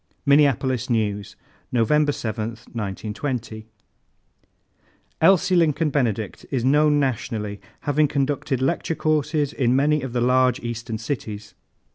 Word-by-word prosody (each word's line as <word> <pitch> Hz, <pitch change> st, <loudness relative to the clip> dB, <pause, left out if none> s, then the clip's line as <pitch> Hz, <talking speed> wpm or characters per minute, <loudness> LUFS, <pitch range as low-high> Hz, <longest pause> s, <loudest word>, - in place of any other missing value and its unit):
Minneapolis 135 Hz, -4 st, +3 dB
News, 105 Hz, -3 st, -1 dB, 0.4 s
November 145 Hz, +5 st, +3 dB
7, 110 Hz, -4 st, -3 dB, 0.3 s
1920. 110 Hz, +2 st, -4 dB, 1.5 s
"Elsie 185 Hz, +1 st, +4 dB
Lincoln 160 Hz, -2 st, +2 dB
Benedict 115 Hz, -7 st, -1 dB
is 130 Hz, -3 st, -1 dB
known 150 Hz, +2 st, +4 dB
nationally, 110 Hz, -6 st, -2 dB, 0.2 s
having 150 Hz, +1 st, +2 dB
conducted 135 Hz, -2 st, -1 dB
lecture 165 Hz, +3 st, 0 dB
courses 155 Hz, -2 st, 0 dB
in 125 Hz, -2 st, +1 dB
many 150 Hz, +2 st, +2 dB
of 130 Hz, -, -5 dB
the 120 Hz, -, 0 dB
large 125 Hz, 0 st, +3 dB
Eastern 115 Hz, -1 st, -4 dB
cities. 105 Hz, -3 st, -5 dB
130 Hz, 110 wpm, -23 LUFS, 115-145 Hz, 1.5 s, Elsie